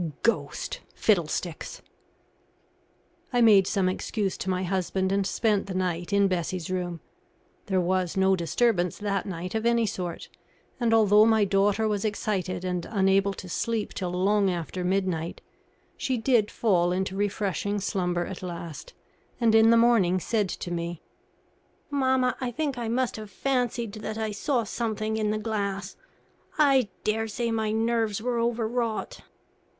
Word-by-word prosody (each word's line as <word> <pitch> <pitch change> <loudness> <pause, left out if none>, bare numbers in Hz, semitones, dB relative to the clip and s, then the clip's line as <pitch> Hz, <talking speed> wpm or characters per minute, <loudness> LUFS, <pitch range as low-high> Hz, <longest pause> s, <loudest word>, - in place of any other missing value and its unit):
"Ghost? 230 - -1 0.2
Fiddlesticks!" 175 -4 -1 1.5
I 245 - +2
made 205 -5 +6
some 190 -2 +1
excuse 195 +1 -2
to 190 - -3
my 185 0 0
husband 190 +1 -1
and 195 -1 +1
spent 210 -3 +1
the 190 - -5
night 180 -1 -2
in 200 0 +4
Bessie's 180 -1 -2
room. 175 -3 -3 0.7
There 190 -2 +1
was 185 0 0
no 190 0 +4
disturbance 180 +1 +1
that 200 -2 -2
night 180 -1 -5
of 220 0 -1
any 235 -1 +3
sort, 180 -4 -4 0.5
and 235 -2 +1
although 215 -1 +6
my 220 -2 +4
daughter 200 +2 +2
was 205 -2 -1
excited 190 -4 -2
and 180 -2 -2
unable 195 -1 +2
to 185 - -8
sleep 225 +4 -2
till 185 -2 -3
long 195 +3 +2
after 180 +1 -3
midnight, 180 -3 -1 0.6
she 260 -2 -1
did 225 -2 +2
fall 180 -6 +2
into 190 +1 -1
refreshing 205 0 -1
slumber 180 -3 -1
at 190 - -7
last, 170 -4 -7 0.4
and 230 -2 +3
in 225 0 +6
the 230 - +6
morning 225 -6 +4
said 210 +1 0
to 175 - -5
me: 170 -1 -4 0.9
"Mamma, 260 -2 +2
I 255 - -1
think 280 +3 -2
I 240 -2 -4
must 245 +1 0
have 215 -1 -8
fancied 245 -2 -1
that 215 0 -5
I 220 -1 -2
saw 240 +4 0
something 220 0 -2
in 215 -1 0
the 215 - 0
glass. 200 -3 -3 0.6
I 270 -7 +4
dare 225 +1 0
say 230 +2 -2
my 220 -1 0
nerves 225 -1 0
were 240 +1 -1
over 230 -1 0
wrought." 230 -1 -2
205 Hz, 155 wpm, -27 LUFS, 185-225 Hz, 1.5 s, made